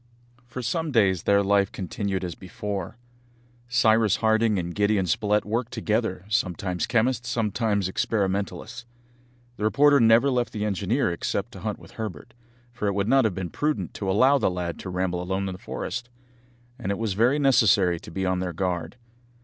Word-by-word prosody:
For 125 +1 -6
some 155 +7 -1
days 95 - +3
their 100 +3 +3
life 100 0 +2
continued 95 +1 -3
as 90 -2 -3
before. 100 +3 -6 0.7
Cyrus 115 -3 +3
Harding 110 -1 +2
and 85 -1 -3
Gideon 105 -1 +1
Spilett 105 +5 +1
worked 115 +3 -2
together, 110 -3 -1
sometimes 90 -5 -1
chemists, 120 0 +1
sometimes 110 -3 0
experimentalists. 100 +4 -2 0.7
The - - -5
reporter 145 +6 +5
never 115 +4 +5
left 125 -2 -1
the 105 -1 -2
engineer 105 +3 0
except 85 - -3
to - - -10
hunt - - -3
with - - -15
Herbert, 110 - -7 0.4
for 105 -3 -3
it 100 - 0
would 100 0 0
not 135 0 +4
have 105 -5 0
been 90 -3 -4
prudent 145 - -2
to 100 - -4
allow 130 +8 +4
the - - +2
lad 90 -3 -4
to - - -6
ramble 90 -1 -1
alone 95 +2 -2
in 95 - -4
the 90 - -10
forest; 120 +6 -5 0.7
and 100 -5 -2
it 100 - -2
was 110 -3 -1
very 120 +8 +3
necessary 105 - +4
to - - -12
be 95 +3 -3
on 95 0 0
their 90 -1 -3
guard. 90 +3 -2
105 Hz, 175 wpm, -25 LUFS, 95-115 Hz, 0.7 s, reporter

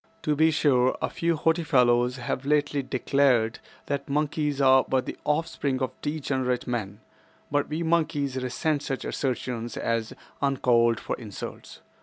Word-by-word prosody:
To 150 - +1
be 160 +2 +4
sure, 130 -5 +2
a - - -2
few 170 0 0
haughty 165 +2 +1
fellows 125 -4 +3
have 125 +1 -3
lately 145 0 +1
declared 130 -3 +1 0.3
that 140 -1 -3
monkeys 150 0 0
are 130 -1 +6
but 130 -1 +1
the - - -5
offspring 150 -3 0
of 130 - -1
degenerate 135 -4 -1
men, 110 -4 -4 0.5
but 145 0 +1
we 155 +3 -2
monkeys 155 -5 0
resent 130 +4 -1
such 135 -2 -4
assertions 125 -3 -3
as 115 -1 -1 0.3
uncalled 120 -4 +3
for - - -3
insults. 105 -5 -9
135 Hz, 145 wpm, -26 LUFS, 125-150 Hz, 0.5 s, are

